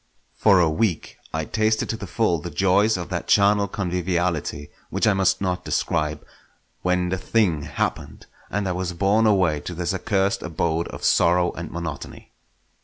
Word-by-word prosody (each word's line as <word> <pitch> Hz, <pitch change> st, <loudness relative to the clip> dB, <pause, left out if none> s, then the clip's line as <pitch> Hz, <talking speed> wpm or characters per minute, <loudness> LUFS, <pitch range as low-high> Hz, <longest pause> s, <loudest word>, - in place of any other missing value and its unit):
For 100 Hz, -4 st, +4 dB
a 85 Hz, -, +4 dB
week 80 Hz, +2 st, -1 dB
I 80 Hz, 0 st, -2 dB
tasted 110 Hz, +3 st, 0 dB
to -, -, -3 dB
the 100 Hz, -3 st, -7 dB
full 90 Hz, -3 st, +1 dB
the 85 Hz, -, -6 dB
joys 95 Hz, +6 st, +2 dB
of 85 Hz, -, -6 dB
that -, -, -4 dB
charnel 100 Hz, 0 st, +4 dB
conviviality 90 Hz, -5 st, -2 dB, 0.2 s
which -, -, 0 dB
I 110 Hz, -, +4 dB
must 95 Hz, -1 st, +1 dB
not 90 Hz, -2 st, -1 dB
describe, 75 Hz, -2 st, -1 dB, 0.6 s
when 90 Hz, 0 st, +1 dB
the 95 Hz, +1 st, -2 dB
thing 95 Hz, -8 st, +1 dB
happened, -, -, -4 dB, 0.2 s
and 100 Hz, 0 st, -2 dB
I -, -, 0 dB
was 90 Hz, 0 st, -3 dB
borne 100 Hz, +5 st, +2 dB
away 90 Hz, -7 st, +2 dB
to 90 Hz, -, -7 dB
this 90 Hz, +2 st, -2 dB
accursed 95 Hz, 0 st, 0 dB
abode 85 Hz, 0 st, -1 dB
of -, -, -9 dB
sorrow 90 Hz, 0 st, +3 dB
and 85 Hz, -1 st, -7 dB
monotony. 85 Hz, -4 st, -7 dB
90 Hz, 170 wpm, -23 LUFS, 85-100 Hz, 0.6 s, For